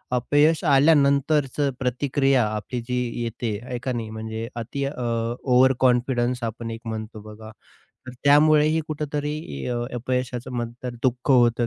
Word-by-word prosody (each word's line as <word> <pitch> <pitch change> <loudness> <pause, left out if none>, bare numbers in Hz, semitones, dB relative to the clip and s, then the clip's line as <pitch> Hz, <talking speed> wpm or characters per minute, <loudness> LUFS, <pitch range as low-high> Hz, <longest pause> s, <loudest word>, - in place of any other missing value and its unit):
अपयश 145 +5 +2
आल्यानंतरचं 140 -1 +3
प्रतिक्रिया 135 0 +1
आपली 110 +3 -4
जी 125 - -2 0.3
येते 115 -2 -3
आहे 125 0 -5
का 130 - -1
नाही 115 -3 -4
म्हणजे 110 +1 -5
अति 120 +4 -4
अ, 135 - -2 0.5
ओव्हर 130 0 +4
कॉन्फिडन्स 125 -1 +1
आपण 115 0 -4
एक 115 0 -7
म्हणतो 110 -1 -6
बघा, 110 +1 -11 0.6
तर 130 - -7
त्यामुळेही 150 +2 +5
कुठेतरी 150 -1 -3 0.3
अ, 125 - -2 0.2
अपयशाचं 125 0 -3
म्हणतात 120 +1 -5
दुःख 125 +1 0
होतं 120 -2 +4
125 Hz, 135 wpm, -24 LUFS, 115-140 Hz, 0.6 s, त्यामुळेही